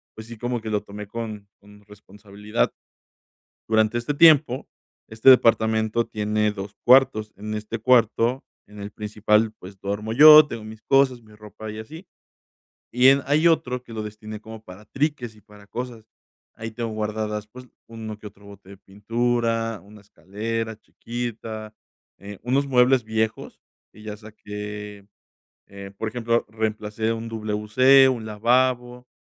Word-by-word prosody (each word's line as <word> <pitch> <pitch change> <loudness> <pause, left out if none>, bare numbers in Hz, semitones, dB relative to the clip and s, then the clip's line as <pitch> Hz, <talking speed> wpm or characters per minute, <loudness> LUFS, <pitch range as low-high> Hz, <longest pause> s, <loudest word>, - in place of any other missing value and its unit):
pues, 110 - -10
sí, 115 - -9
como 120 +2 -3
que 110 - -6
lo 105 - 0
tomé 105 0 -9
con 110 -2 -7
con 105 0 -19
responsabilidad. 105 +1 -4 0.9
Durante 110 +1 +2
este 120 +5 -2
tiempo, 145 -5 +5 0.4
este 110 +4 +4
departamento 110 -2 +3
tiene 105 0 -1
2 100 0 -7
cuartos, 120 -4 +4
en 105 +1 -6
este 105 +2 -5
cuarto, 120 +2 +2 0.3
en 105 0 -13
el 100 0 -7
principal, 105 +1 0
pues, 95 +2 -12
duermo 105 +3 -3
yo, 150 +3 +9
tengo 115 -5 -7
mis 110 0 -11
cosas, 135 -3 +2
mi 110 -1 -19
ropa, 105 +1 -10
y 110 - -8
así, 160 - -11 0.8
y 125 +2 +4
en 140 +1 +4
hay 155 +4 +3
otro 125 -6 +1
que 120 - -12
lo 110 -1 -4
destiné 105 0 -9
como 110 0 -11
para 90 +1 -13
triques 135 -3 -3
y 105 - -20
para 105 0 -18
cosas. 120 -2 -7 0.5
Ahí 115 0 -7
tengo 115 +1 -4
guardadas, 105 0 -4
pues, 125 +4 -13 0.2
uno 110 -2 -8
que 105 - -9
otro 100 0 -17
bote 100 -1 -15
de 100 - -13
pintura, 115 +2 -2
una 105 +1 -16
escalera 110 +3 -5
chiquita, 115 -3 -7 0.5
eh, 100 0 -10
unos 135 +4 0
muebles 125 -1 +3
viejos 110 0 -3 0.3
que 105 - -15
ya 105 -1 -7
saqué, 105 -1 -9 0.6
eh, 100 0 -10
por 110 - -2
ejemplo, 115 0 -1
reemplacé 110 0 -2
un 115 0 -5
WC, 110 +5 +3
un 120 -4 -2
lavabo, 125 +3 0
110 Hz, 150 wpm, -23 LUFS, 105-120 Hz, 0.9 s, yo